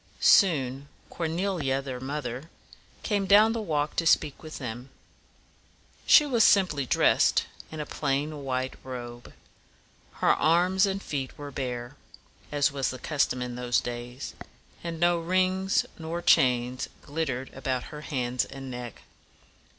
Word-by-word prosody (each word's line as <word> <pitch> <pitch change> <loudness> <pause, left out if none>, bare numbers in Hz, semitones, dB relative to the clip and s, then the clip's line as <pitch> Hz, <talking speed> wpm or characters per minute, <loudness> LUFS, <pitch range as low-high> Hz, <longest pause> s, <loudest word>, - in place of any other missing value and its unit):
Soon 140 - +4 0.2
Cor 165 - -2
ne´li 170 -3 -1
a, - - -1
their 135 -2 -6
mother, 135 +1 -5 0.5
came 205 -3 0
down 215 +3 +6
the 230 - -2
walk 150 -6 -1
to 165 - +1
speak 150 -3 +2
with 155 -1 -8
them. 125 0 -6 1.2
She 300 - +8
was 240 -6 +3
simply 150 -9 +3
dressed - - +3 0.3
in 155 - -7
a 150 - -3
plain 145 +1 -2
white 130 -1 -2
robe. 120 -2 -8 0.8
Her - - +3
arms 180 +4 +3
and 195 0 -3
feet 135 -3 -4
were 145 -1 -7
bare, 125 -3 -5 0.5
as 145 0 +2
was 135 -2 -1
the 130 - -5
custom 130 -3 0
in 125 0 -5
those 125 0 0
days; 120 +1 -6 0.5
and 165 -1 -5
no 175 0 +3
rings 185 +2 +1
nor 165 +2 -4
chains 125 0 +3 0.2
glit 160 +2 -2
tered 130 0 -5
about 130 -1 -2
her 150 - -7
hands 125 -5 -1
and 135 -1 -8
neck. 120 -2 -8
145 Hz, 145 wpm, -27 LUFS, 125-170 Hz, 1.2 s, She